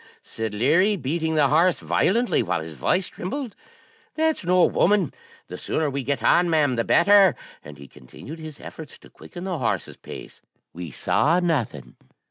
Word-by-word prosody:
said 110 -1 -5
Leary, 165 - +3
beating 160 +1 -2
the 145 -3 +3
horse 170 +5 +3
violently, 235 +5 +1
while - - -1
his 80 0 -8
voice 180 - 0
trembled, 240 +4 -6 0.6
'that's 315 -6 0
no 180 +1 +4
woman; 195 -5 +2 0.3
the - - -9
sooner 155 -3 -1
we 140 +1 -3
get 140 +2 -3
on, 175 0 +4
ma'am, 150 -5 +2
the 115 - 0
better;' 195 - +5 0.3
and 75 0 -11
he 70 0 -12
continued 135 - -12
his 155 -2 -9
efforts 155 -3 -10
to - - -19
quicken 175 - -11
the 185 -4 -3
horse's 120 - -2
pace. - - -11 0.3
We 85 -1 -7
saw 160 - +1
nothing. 145 - -2
160 Hz, 165 wpm, -23 LUFS, 130-185 Hz, 0.6 s, better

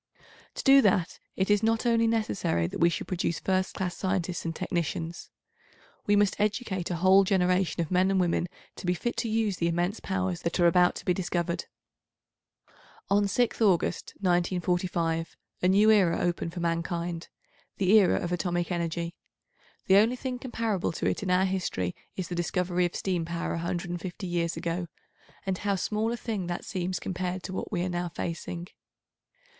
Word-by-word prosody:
To - - -4
do 275 0 +8
that 185 -5 +1 0.2
it 190 +2 +1
is 205 -1 +4
not 225 +1 +1
only 230 -1 +3
necessary 160 - 0
that 85 - -5
we 170 - +5
should 170 - -3
produce 170 -2 -1
first 190 0 0
class 180 -2 -2
scientists 185 -2 -2
and 165 0 -2
technicians. 170 0 -3 0.8
We 205 - +4
must 205 -1 +2
educate 205 -3 -1
a 175 - -1
whole 190 +3 +6
generation 185 -2 +2
of 165 - -8
men 185 +1 +3
and 195 -1 +2
women 175 -1 +1 0.3
to - - -6
be 180 - +2
fit 240 +7 -2
to 235 -1 -1
use 215 -3 0
the 170 - +1
immense 175 +5 0
powers 185 -2 -2
that 170 +2 -2
are 175 - +5
about 180 +1 +5
to - - -8
be 180 - +3
discovered. 175 -1 -2 1.5
On 205 0 +4
6th 235 +4 0
August, 190 -6 +1
1945, 175 -2 0 0.2
a 180 - +3
new 205 +4 +5
era 190 -6 +4
opened 175 -1 -1
for 175 - -3
mankind—the 170 +2 -3
era 210 -3 +6
of 175 - -3
atomic 175 0 -1
energy. 170 0 -2 0.7
The 190 - +6
only 225 +5 +4
thing 250 0 -4
comparable 230 -7 -1
to - - -3
it - - 0
in 195 - -3
our 180 +1 +4
history 180 - -2 0.2
is 185 -2 -3
the 180 - -5
discovery 175 +1 0
of 175 - -11
steam 180 -3 -1
power 170 +1 -3
150 175 +2 -4
years 170 -2 -1
ago, 170 +1 -2 0.6
and 190 -1 -1
how 200 -1 0
small 215 +4 -1
a 240 - -2
thing 215 -6 -3
that 175 0 -4
seems 185 -1 -2
compared 185 0 -3
to 190 - -6
what - - -4
we 175 -4 0
are 185 - -1
now 175 0 -2
facing. 170 +1 -5
180 Hz, 175 wpm, -28 LUFS, 170-195 Hz, 1.5 s, do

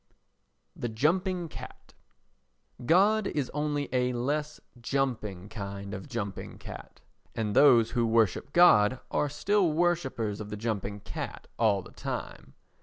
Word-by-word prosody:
The 120 - -3
Jumping 175 +9 0
Cat - - -11 0.9
God 195 - +4
is 145 -4 -2
only 150 -1 -1
a 125 0 +1
less 150 +5 -2 0.2
jumping 115 -8 -2
kind 100 -2 -6
of 95 - -7
jumping 110 -7 -5
cat; - - -10 0.3
and 105 -2 -2
those 125 -6 +6
who 120 -2 +1
worship 110 +2 +2
God 130 -9 +6
are 150 - +1
still 180 +5 +1
worshippers 150 -11 0
of 105 - -7
the 105 - -5
jumping 105 -2 -3
cat - - -6
all 105 -4 +3
the - - -13
time. - - -6
125 Hz, 130 wpm, -29 LUFS, 105-150 Hz, 0.9 s, those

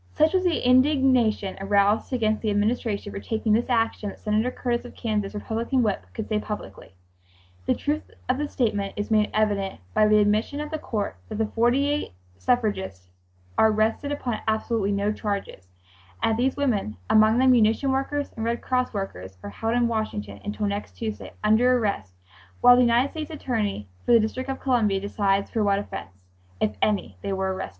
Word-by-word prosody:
Such 310 +3 +3
was 375 -1 +2
the 340 -8 +1
indignation 255 -6 +3
aroused 200 +3 +2
against 220 -4 +1
the 220 - -1
Administration 210 0 0
for - - -5
taking 220 0 -1
this 235 +4 +1
action 225 -3 0
that - - -11
Senator 215 +3 0
Curtis 240 -1 -2
of 245 - -11
Kansas, 210 -3 -2
Republican 230 +4 -1
whip, 205 -3 -1
could 220 - -4
say 215 -1 0
publicly: 210 - -7 0.7
"The - - +3
truth 295 +1 -2 0.2
of 255 +2 +1
this 295 -1 -3
statement 205 -5 -1
is 205 +1 -4
made 215 -1 +3
evident 205 -3 0
by 215 - +4
the 215 0 +5
admission 210 +7 +1
of 300 +1 -5
the 315 - -3
court 210 - -3
that - - -5
the 220 - +1
forty 240 +6 +2
eight 290 - -2 0.3
suffragists 95 - -1 0.5
are 220 - +6
arrested 220 +6 0
upon 250 -6 -2
absolutely 220 -1 0
no 200 +1 0
charges, 200 - -4 0.6
and - - +3
that 220 - 0
these 265 +2 +1
women, 215 - 0
among 215 +1 +5
them 260 +1 +5
munition 235 +3 +3
workers 280 +2 -2
and 225 - -4
Red 235 +1 -1
Cross 255 -3 0
workers, 95 - -5
are 100 - -6
held 225 - -2
in 240 -1 +3
Washington 105 - -3
until 210 +1 -3
next 200 0 -3
Tuesday, 220 -2 -5
under 240 +4 +4
arrest, 200 - -2 0.5
while 245 0 +8
the 250 - +4
United 245 +3 +3
States 315 -2 -5
attorney 225 - -2 0.2
for - - +3
the 230 - +8
District 255 +5 -2
of 270 - -3
Columbia 225 -7 +2
decides 200 0 0
for 220 - 0
what 200 -1 +3
offense, 95 - -7 0.4
'if 105 - +1
any,' 210 -2 0
they 200 - -3
were 190 0 -1
arrested. 185 - -5
220 Hz, 190 wpm, -25 LUFS, 205-250 Hz, 0.7 s, while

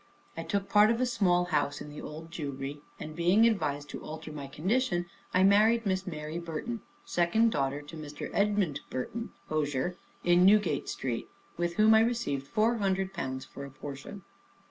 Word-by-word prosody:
I - - -4
took 200 -1 -2
part 210 +1 +6
of 230 0 +1
a 255 - +3
small 180 -7 +2
house 145 -1 +1
in 150 - -8
the 150 - -8
Old 160 +2 -8
Jewry; 140 -2 -5 0.2
and 155 0 -7
being 180 +7 +4
advised 145 -11 +1
to - - -6
alter 155 0 -7
my 145 -2 -6
condition, 175 - 0 0.3
I 185 - +4
married 215 +4 +5
Miss 190 -1 0
Mary 155 -1 -4
Burton, 170 +8 -4 0.2
second 220 +7 +3
daughter 140 -1 -1
to 145 +3 -10
Mr. 150 -2 -7
Edmund 200 -8 +1
Burton, 230 - -4 0.2
hosier, 150 +2 -1 0.3
in 175 0 +5
Newgate 195 -6 +4
Street, 120 -3 -3 0.3
with 170 0 -1
whom 215 +1 +6
I 220 - +7
received 225 - 0
four 230 +4 +2
hundred 190 -2 0
pounds 130 -6 -4
for 140 - -9
a 140 - -7
portion. 140 +8 -8
175 Hz, 175 wpm, -30 LUFS, 145-210 Hz, 0.3 s, I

